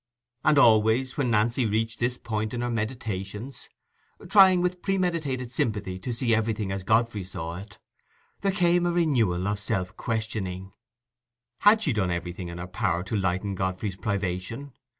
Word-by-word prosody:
And 150 Hz, -, +4 dB
always, 115 Hz, +1 st, +4 dB
when 135 Hz, -4 st, 0 dB
Nancy 115 Hz, +2 st, +2 dB
reached 110 Hz, +2 st, -1 dB
this 125 Hz, +1 st, 0 dB
point 110 Hz, 0 st, -3 dB
in 120 Hz, -, -2 dB
her 120 Hz, 0 st, -1 dB
meditations—trying, 115 Hz, -, 0 dB
with 180 Hz, 0 st, -1 dB
predetermined 165 Hz, -10 st, -1 dB
sympathy, 105 Hz, -6 st, -2 dB
to 120 Hz, -, -4 dB
see 120 Hz, 0 st, 0 dB
everything 110 Hz, -2 st, 0 dB
as 95 Hz, 0 st, -3 dB
Godfrey 110 Hz, 0 st, +1 dB
saw 85 Hz, -2 st, -6 dB
it—there 105 Hz, -, -8 dB
came 175 Hz, -2 st, +2 dB
a -, -, +1 dB
renewal 120 Hz, -, +1 dB
of 100 Hz, 0 st, -1 dB
self 95 Hz, -2 st, -2 dB
questioning. 105 Hz, -5 st, -3 dB, 0.9 s
Had 215 Hz, +2 st, +5 dB
she -, -, +1 dB
done 100 Hz, -4 st, 0 dB
everything 85 Hz, +1 st, -4 dB
in 85 Hz, 0 st, -7 dB
her 90 Hz, -, -5 dB
power 90 Hz, -2 st, -1 dB
to 100 Hz, +3 st, -4 dB
lighten 95 Hz, 0 st, 0 dB
Godfrey's 95 Hz, +1 st, -2 dB
privation? 100 Hz, +6 st, -3 dB
110 Hz, 150 wpm, -26 LUFS, 95-130 Hz, 0.9 s, Had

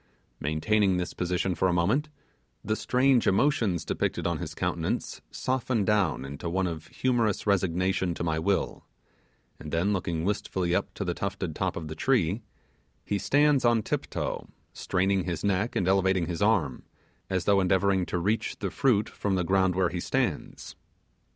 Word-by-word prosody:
Maintaining 95 Hz, +6 st, +1 dB
this 90 Hz, 0 st, -3 dB
position 90 Hz, +1 st, -1 dB
for 95 Hz, -, +1 dB
a 90 Hz, -, +1 dB
moment, 110 Hz, -, +1 dB, 0.6 s
the 110 Hz, -, +1 dB
strange 125 Hz, +1 st, +2 dB
emotions 100 Hz, -, +2 dB
depicted -, -, -2 dB
on -, -, 0 dB
his -, -, -6 dB
countenance -, -, -2 dB
soften 125 Hz, -4 st, -1 dB
down 95 Hz, -10 st, +1 dB
into 70 Hz, +5 st, -5 dB
one 95 Hz, +2 st, 0 dB
of 80 Hz, -2 st, -5 dB
humorous 120 Hz, -5 st, 0 dB
resignation 95 Hz, -2 st, +1 dB
to -, -, -4 dB
my 80 Hz, -1 st, 0 dB
will, 95 Hz, +4 st, -1 dB, 0.8 s
and 75 Hz, -, -8 dB
then 90 Hz, +5 st, +1 dB
looking 85 Hz, -3 st, -2 dB
wistfully 95 Hz, -3 st, -1 dB
up 100 Hz, +2 st, 0 dB
to 100 Hz, -, -3 dB
the 90 Hz, -, -1 dB
tufted 95 Hz, -4 st, -4 dB
top -, -, -1 dB
of 80 Hz, -2 st, -5 dB
the 80 Hz, -, -5 dB
tree, 105 Hz, +1 st, +1 dB, 0.6 s
he 100 Hz, -, -1 dB
stands 145 Hz, +1 st, +3 dB
on 120 Hz, -2 st, +3 dB
tip -, -, -2 dB
toe, -, -, -3 dB, 0.3 s
straining 95 Hz, 0 st, 0 dB
his 85 Hz, -4 st, -3 dB
neck 100 Hz, +3 st, 0 dB
and 90 Hz, -, +1 dB
elevating 95 Hz, -2 st, +3 dB
his 85 Hz, +2 st, -4 dB
arm, 100 Hz, -, +2 dB, 0.5 s
as 95 Hz, -2 st, -1 dB
though 100 Hz, -1 st, +4 dB
endeavouring 95 Hz, 0 st, +2 dB
to 90 Hz, -, -2 dB
reach 105 Hz, +6 st, -1 dB
the 100 Hz, -3 st, -3 dB
fruit 110 Hz, -3 st, +2 dB
from 100 Hz, -2 st, -2 dB
the 90 Hz, -, +1 dB
ground 95 Hz, 0 st, +2 dB
where 90 Hz, -2 st, +2 dB
he 90 Hz, 0 st, -4 dB
stands. -, -, -2 dB
95 Hz, 170 wpm, -27 LUFS, 85-105 Hz, 0.8 s, though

